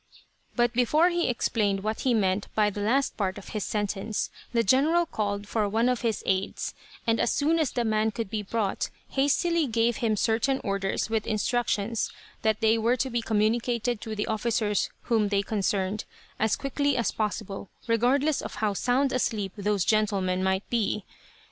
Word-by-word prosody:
But 240 -1 +2
before 300 +8 +4
he 345 -3 0
explained 205 -5 0
what 215 +1 -2
he 255 -3 +2
meant 195 -1 +1
by 210 -1 +3
the 205 - -5
last 265 +7 +1
part 190 -2 -1
of 200 - -10
his 210 -3 -3
sentence, 205 0 -2 0.2
the 230 -1 +2
general 305 - +3
called 205 -6 -3
for 210 -2 0
one 225 +4 +2
of 250 -1 +1
his 230 -4 -1
aids, 190 0 -1 0.3
and 230 0 +2
as - - +2
soon 315 +3 +2
as 310 -5 +2
the 240 -2 -1
man 215 0 +2
could 225 0 -4
be 215 +1 -3
brought, 205 -1 -1 0.2
hastily 305 +4 +2
gave 230 0 +1
him 220 -2 +1
certain 235 +6 +1
orders 195 +2 -1
with 220 -1 0
instructions 225 0 0 0.3
that 220 -1 +1
they 225 0 +4
were 235 +3 +2
to 265 0 -1
be 235 0 0
communicated 230 +2 0
to 220 -1 -5
the 210 - -1
officers 220 -1 0
whom 225 -3 +2
they 200 0 +1
concerned, 200 0 -1 0.3
as 220 -1 +2
quickly 285 +1 0
as 235 - +1
was - - -7
possible, 205 -2 -3 0.2
regardless 255 +6 +2
of - - -7
how 215 -2 0
sound 255 +6 +1
asleep 215 -6 -1
those 205 -2 0
gentlemen 195 -4 +1
might 190 +1 0
be. 215 -3 0
220 Hz, 180 wpm, -27 LUFS, 205-245 Hz, 0.3 s, before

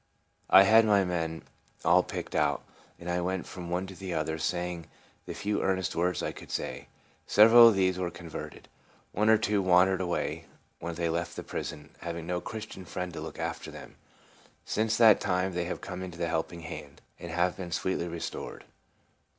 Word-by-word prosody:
I 95 +1 +9
had 110 +3 +6
my 105 -3 +4
men 80 -3 -2 0.4
all - - +6
picked - - -6
out, - - +1 0.3
and 85 - -10
I 90 0 0
went 95 +1 -2
from 90 -2 -8
one 90 +2 -1
to 95 - -9
the 90 -1 -5
other, 80 0 -2
saying 85 0 -2 0.4
the - - -5
few 105 0 -1
earnest 95 -3 0
words 90 +2 0
I - - -1
could - - -12
say. - - -4 0.4
Several 115 +3 +9
of 115 - +5
these 95 -1 +2
were 90 -1 -1
converted. 85 -3 -9 0.4
One 105 +2 +2
or 110 - +7
two 105 -1 +1
wandered 95 0 +4
away 90 -1 -2 0.3
when 85 0 -5
they 85 0 -1
left 85 +1 -2
the - - -6
prison, 75 - -6
having 85 -1 -5
no 90 +1 -2
Christian 110 -2 -7
friend 90 0 -5
to 80 - -6
look 80 - -7
after - - -4
them. - - -11 0.7
Since 110 +1 0
that 110 -3 +7
.time 90 0 0
they 90 0 -1
have 90 - -4
come 90 -1 -6
into 90 -2 -7
the 85 -1 -1
Helping 85 +1 -2
Hand, 75 - -8 0.2
and 85 - -7
have 85 +2 +1
been 90 -3 -7
sweetly 85 0 -1
restored. 85 -1 -6
90 Hz, 190 wpm, -29 LUFS, 85-95 Hz, 0.7 s, I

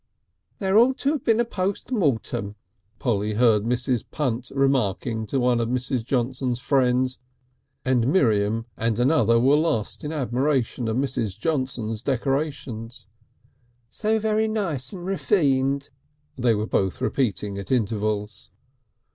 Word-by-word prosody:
"There 195 +2 +3
ought 255 +3 +4
to 280 - +1
have 300 -5 -2
been 225 0 +3
a 240 - +3
post 200 +1 -3
mortem," 120 - -1 0.4
Polly 105 -4 -1
heard 110 -2 +4
Mrs. 125 0 0
Punt 125 -4 -2
remarking 120 -5 0
to 135 - 0
one 125 -1 +2
of 115 -1 -1
Mrs. 125 0 -1
Johnson's 125 0 -1
friends, 130 -1 +1 0.7
and 125 -2 +2
Miriam 115 - +2
and 115 0 -1
another 120 -4 +4
were 135 +4 +4
lost 155 -9 -1
in 150 - -3
admiration 130 -3 0
of 110 +1 -1
Mrs. 115 -7 -1
Johnson's 125 -8 -2
decorations. 130 -3 -3 0.9
"So 220 +1 0
very 220 0 +1
nice 170 - -2
and 180 -2 -8
refined," 140 -8 +1 0.4
they 120 -3 +2
were 105 +1 -1
both 95 -3 0
repeating 100 -5 -1
at 100 +3 -7
intervals. 105 -3 -1
125 Hz, 130 wpm, -24 LUFS, 115-150 Hz, 0.9 s, ought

